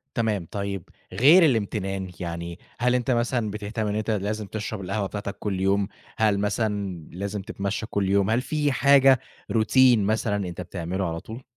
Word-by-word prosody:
تمام، 110 -6 0
طيب 100 -2 -3 0.3
غير 165 +8 +7
الامتنان 95 - -1
يعني، 85 0 -5 0.2
هل 125 +1 +2
أنت 125 +1 0
مثلًا 120 -2 0
بتهتم 105 +1 -3
إن 105 - -1
أنت 110 +1 -2
لازم 105 +1 -2
تشرب 110 0 -5
القهوة 100 +2 -2
بتاعتك 100 0 -5
كلّ 100 -3 -2
يوم؟ 100 +1 +2 0.3
هل 105 -2 +2
مثلًا 100 -4 -1
لازم 100 +3 -4
تتمشى 100 +2 -3
كلّ 100 -3 -1
يوم؟ 100 0 +3
هل 115 +3 +2
في 145 +2 0
حاجة 135 0 +5 0.3
routine 120 +2 +5
مثلًا 105 -1 0
أنت 90 0 -6
بتعمله 90 +1 -3
على 80 0 -4
طول؟ 110 +8 -9
105 Hz, 165 wpm, -25 LUFS, 95-115 Hz, 0.3 s, غير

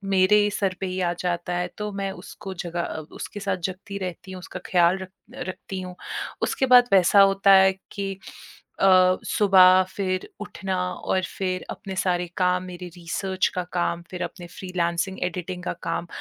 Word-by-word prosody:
मेरे 190 +3 +5
ही 205 - +2
सर 190 -2 0
पे - - 0
ही 185 0 -3
आ 175 -1 +1
जाता 175 0 -2
है। 180 0 -1
तो 210 0 -3
मैं 195 0 -2
उसको 195 -1 -8
जगा 170 0 -2
अ, 160 - -4 0.2
उसके 205 - -6
साथ 200 -1 -1
जागती 195 +2 -7
रहती 185 +2 -9
हूँ, 185 - -7
उसका - - -8
ख़्याल 175 +1 +4
रख 190 - -7 0.4
रखती 185 0 -6
हूँ। 180 -1 -8 0.5
उसके 265 - +1
बाद 245 0 +8
वैसा 195 +2 +6
होता 195 0 +5
है 190 - +4 0.2
कि 195 -1 -3 0.7
अ, 185 -1 +5
सुबह 185 -2 +6
फिर 185 -2 -2
उठना 190 -2 -4 0.2
और 190 - -1 0.2
फिर 185 -1 -2
अपने 190 -1 -6
सारे 180 -2 0
काम, 180 0 +2
मेरे 180 0 -8
रिसर्च 190 +2 -1
का 180 - -1
काम, 175 -1 0
फिर 180 0 -4
अपने 175 -2 -7
फ़्रीलांसिंग, 180 0 -2
एडिटिंग 180 0 -4
का - - -2
काम 170 - -2
185 Hz, 180 wpm, -24 LUFS, 180-195 Hz, 0.7 s, बाद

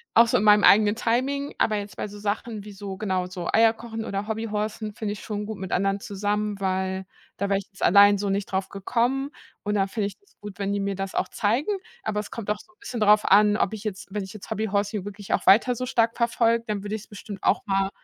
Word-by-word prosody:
Auch 230 +1 +7
so - - +3
in - - 0
meinem 210 -1 +6
eigenen 210 +1 +6
Timing, 270 +5 -1
aber 215 -1 +2
jetzt 205 0 -6
bei - - -4
so 205 0 -10
Sachen 210 +1 -3
wie 205 - -9
so, 195 -1 -7
genau, 185 -3 -1
so 180 -2 -6
Eier 225 0 +6
kochen 225 -1 -6
oder 200 -1 -3
Hobby-horsen 215 -1 -3
finde 210 -1 -3
ich 205 - -9
schon 210 -1 -4
gut 220 -1 -6
mit 190 -1 -6
anderen 195 +1 +1
zusammen, 205 +1 -2
weil 190 0 -1 0.3
da 200 - -1
wäre 195 0 +2
ich 200 - -11
jetzt 195 - -8
allein 205 +1 +7
so 200 0 -2
nicht 195 0 -1
drauf 190 0 -1
gekommen 245 +7 0 0.3
und 210 0 -1
da 195 -1 +2
finde 205 0 -2
ich 200 - -9
das 405 - -31
gut, 205 -1 -8
wenn 200 0 -1
die 205 - 0
mir 200 0 -1
das 195 0 -5
auch - - 0
zeigen. 235 - 0 0.3
Aber 210 -1 -1
es 210 - -6
kommt 220 -3 -6
auch 210 - +1
so 360 - -18
'n - - -41
bisschen 255 - -5
drauf 210 0 +5
an, 210 +1 +5
ob 205 - +1
ich 220 -1 -6
jetzt 195 -2 -5
wenn 205 0 -2
ich 190 - -9
jetzt 210 - -10
Hobby 220 +2 -1
Horsing 205 0 -1
hier - - -12
wirklich 205 -1 -5
auch - - 0
weiter 230 +5 +6
so 255 +2 -3
stark 230 -2 +1
verfolge, 235 -1 +2
dann 210 -2 -2
würde 210 +1 -3
ich's 215 - -8
bestimmt 205 -1 -9
auch - - +3
mal 195 -1 +1
210 Hz, 260 wpm, -25 LUFS, 195-220 Hz, 0.3 s, Auch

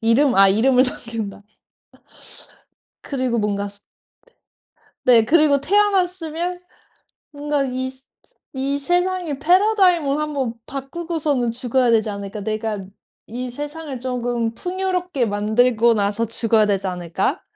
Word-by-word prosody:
이름 245 +4 +3
아 195 0 +7
이름을 250 +6 +4
남긴다. 230 -5 -5 1.6
그리고 255 -4 -2
뭔가 205 -1 -1
스 200 0 -9 1.3
네. 235 -3 +6
그리고 300 0 +4
'태어났으면 360 -2 0 0.7
뭔가 290 -1 -1
이 260 0 -3
스 260 0 -7
스 - - -35 0.4
이 275 +1 -2
세상의 355 0 0
패러다임을 360 -3 +3
한번 285 -6 -2
바꾸고서는 280 -2 -2
죽어야 245 +1 +1
되지 220 -1 +2
않을까? 200 +1 -6
내가 215 -1 -3 0.4
이 250 +3 -5
세상을 295 0 -6
쪼금 240 -2 -2
풍요롭게 360 -5 -2
만들고 220 +3 +2
나서 210 +1 +1
죽어야 225 -1 +3
되지 200 -2 0
않을까?' 180 - -2
255 Hz, 265 characters per minute, -21 LUFS, 225-305 Hz, 1.6 s, 아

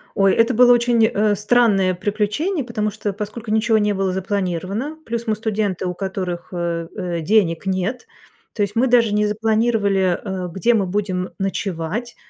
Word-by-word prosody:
Ой, 195 -1 +4
это 230 +2 +3
было 245 +1 +6
очень, 235 -2 +3
э, 210 -2 +1
странное 210 -3 +3
приключение, 215 - -1
потому 215 -3 -2
что, 205 -1 -4
поскольку 215 +2 -6
ничё 220 0 +3
не 210 -1 +1
было 190 -1 -1
запланировано, 195 - -3
плюс 235 0 -4
мы 215 - +1
студенты, 210 -4 -2
у 180 - -2
которых, 180 -2 -4
э, 170 -1 -3
э, 175 -4 -3
денег 180 -2 +2
нет. 190 +6 -2 0.5
То 210 - 0
есть 200 +2 -3
мы 255 +3 +3
даже 235 -3 +3
не 210 0 +2
запланировали, 210 -4 +1
э, 190 -3 -4
где 230 +7 +2
мы 200 -4 +2
будем 185 -2 -2
ночевать, 195 +4 -3
210 Hz, 165 wpm, -20 LUFS, 190-225 Hz, 0.5 s, было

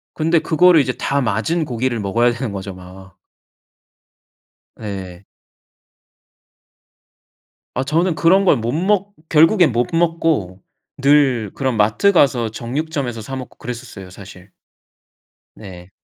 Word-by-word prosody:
근데 165 +1 +2
그거를 165 +1 +4
이제 130 -1 -2
다 140 0 -1
맞은 125 +9 -1
고기를 120 -2 -2
먹어야 115 +4 +1
되는 120 -1 -4
거죠 100 0 -6
막. 95 +1 -14 1.6
예. 95 -3 -8 2.5
어 130 - -1
저는 165 +5 0
그런 190 +5 +3
걸 165 - +4
못 115 +1 -3
먹 200 +4 0 0.2
결국엔 165 +2 +4
못 120 +1 0
먹고 165 - 0 0.4
늘 135 -7 +2
그런 130 -4 -2
마트 110 - +3
가서 135 - +2
정육점에서 125 +1 -4
사 135 +5 -7
먹고 130 -1 -9
그랬었어요 120 -6 -8
사실. 95 0 -13 1.1
네. 90 -3 -12
125 Hz, 220 characters per minute, -18 LUFS, 105-160 Hz, 2.5 s, 그거를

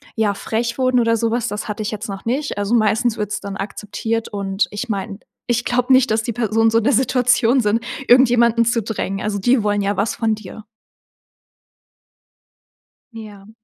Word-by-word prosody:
ja, 215 -2 +1
frech 235 +3 -3
wurden 255 -1 +2
oder 230 -1 +2
sowas, 230 +1 -1
das 210 +1 -5
hatte 210 0 -4
ich 210 - -3
jetzt 215 0 -6
noch 195 -1 -7
nicht. 270 +4 -2
Also, 205 +2 -1
meistens 225 +1 +1
wird 210 -1 -3
es - - -2
dann 200 -1 -6
akzeptiert. 220 +3 -4
Und 195 -1 -1
ich 205 +4 -5
meine, 200 0 -4 0.3
ich 240 0 0
glaube 250 +1 +2
nicht, 260 0 +4
dass 220 +1 +1
die 235 - -3
Personen 225 0 +1
so 225 - +3
in - - -4
der 280 - +3
Situation 250 0 +3
sind, 215 +1 +1 0.3
irgendjemanden 235 -2 +5
zu 235 0 +1
drängen. 195 -2 -3
Also, 210 -1 -2
die 240 +5 +2
wollen 205 -1 0
ja 200 +1 -1
was 205 +2 0
von 225 -2 0
dir. 215 +1 -11 2.5
Ja. 210 -3 -11
225 Hz, 185 wpm, -19 LUFS, 205-240 Hz, 2.5 s, irgendjemanden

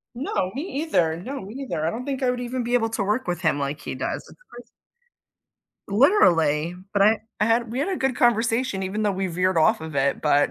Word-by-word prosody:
No, 215 -8 -2
me 275 - -3 0.2
either. 165 - +1
No, 265 +10 -6
me 205 +5 -9
neither, 250 - -3
I - - +2
don't 245 +6 -5
think 275 -1 -3
I 255 - +2
would 250 0 -1
even 245 0 -3
be 240 +1 0
able 225 -2 +1
to 220 -2 -2
work 210 +2 -1
with 175 0 -2
him 160 -4 +2
like 140 +1 -3
he - - -5
does. 130 - -3
It's - - -17
crazy. 240 0 -11 1.2
Literally, 175 - +3 0.2
but 200 - +2
I 215 +2 +5 0.2
I - - +4
had 230 0 +1
we 255 - -2
had 360 - 0
a 370 - -1
good 265 -2 0
conversation 230 -3 +1
even 210 +3 -2
though 205 - +2
we 190 0 -2
veered 180 +1 0
off 155 - +3
of 160 -2 -7
it, 135 0 +1
but 145 -1 +3
210 Hz, 235 wpm, -24 LUFS, 170-245 Hz, 1.2 s, I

